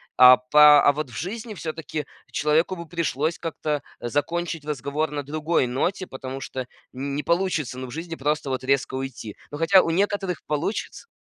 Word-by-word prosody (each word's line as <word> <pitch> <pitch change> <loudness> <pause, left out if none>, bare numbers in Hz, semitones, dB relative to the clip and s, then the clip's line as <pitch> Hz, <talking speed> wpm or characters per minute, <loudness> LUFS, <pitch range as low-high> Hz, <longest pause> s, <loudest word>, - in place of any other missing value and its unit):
А 125 0 +9
по 150 +3 +7
а - - +8
вот 150 -1 -4
в 115 - -9
жизни 215 +4 -5
всё-таки 160 -3 -5 0.3
человеку 155 +5 +1
бы 170 -2 -8
пришлось 165 -1 -1
как-то 150 -3 -2 0.2
закончить 160 +5 -2
разговор 150 +1 -2
на 145 -1 -3
другой 155 +1 0
ноте, 175 +10 -1
потому 130 0 -6
что 130 -1 -5 0.3
не 140 +3 -3
получится, 170 -7 0
ну, 130 - -5
в - - -10
жизни 165 +4 -5
просто 150 0 -1
вот 130 0 -2
резко 135 0 +1
уйти. 130 -5 -5 0.2
Ну, 145 - -5
хотя 170 +4 +6
у - - -2
некоторых 195 0 0
получится 155 - -3
150 Hz, 170 wpm, -24 LUFS, 135-170 Hz, 0.3 s, А